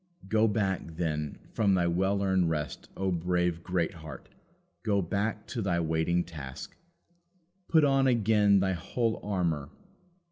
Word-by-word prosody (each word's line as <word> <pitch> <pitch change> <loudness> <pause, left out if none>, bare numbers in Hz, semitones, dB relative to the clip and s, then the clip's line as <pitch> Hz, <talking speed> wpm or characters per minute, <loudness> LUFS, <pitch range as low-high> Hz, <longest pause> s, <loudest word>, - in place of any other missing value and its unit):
Go 110 +2 +3
back, 95 -6 -1
then, 75 -3 -2
from 100 -3 +2
thy 90 -1 +2
well 95 +4 +1
earned 95 -3 +2
rest, 75 -3 -4
O 95 0 0
brave 90 0 0
Greatheart! 85 -3 -3 0.5
go 105 -3 +1
back 105 +4 -2
to 120 -2 -3
thy 90 -4 +1
waiting 80 +2 +1
task. 70 -4 -8 0.9
Put 160 -2 +4
on 135 -1 +4
again 105 -4 +4
thy 95 0 +1
whole 115 +6 -1
armour. 85 -8 -1
95 Hz, 135 wpm, -29 LUFS, 85-105 Hz, 0.9 s, Put